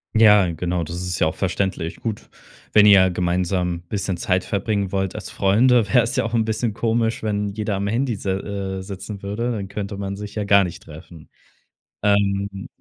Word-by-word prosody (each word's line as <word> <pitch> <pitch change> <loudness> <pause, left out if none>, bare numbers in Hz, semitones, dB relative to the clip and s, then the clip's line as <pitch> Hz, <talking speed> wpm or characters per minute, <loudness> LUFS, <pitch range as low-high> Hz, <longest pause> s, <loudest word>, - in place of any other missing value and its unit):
Ja, 105 -5 +6
genau, 85 +1 -2
das 85 +2 -6
ist 90 0 -3
ja - - +3
auch 80 - 0
verständlich. 95 -3 -2
Gut, 110 -3 -5 0.4
wenn 105 -1 +6
ihr 95 -3 +7
gemeinsam 90 0 -1
bisschen 100 -2 -2
Zeit 90 +1 0
verbringen 100 -1 -1
wollt 95 -1 -1
als - - -7
Freunde, 115 +3 +3
wäre 125 -3 +5
es 115 - -3
ja - - +1
auch 115 +1 -3
'n 110 -1 +2
bisschen 110 0 -1
komisch, 115 0 0
wenn 105 -1 -1
jeder 105 0 -3
am 100 +1 -2
Handy 120 +3 0
s 100 - -8
äh, 95 0 -3
sitzen 100 +1 -8
würde, 115 +5 -2
dann 100 -4 -4
könnte 100 0 -5
man 100 0 -4
sich 105 0 -8
ja 105 - -1
gar 100 -1 +5
nicht 85 - -8
treffen. 80 +1 -13 0.7
Ähm. 100 -1 0
100 Hz, 190 wpm, -22 LUFS, 95-105 Hz, 0.7 s, ihr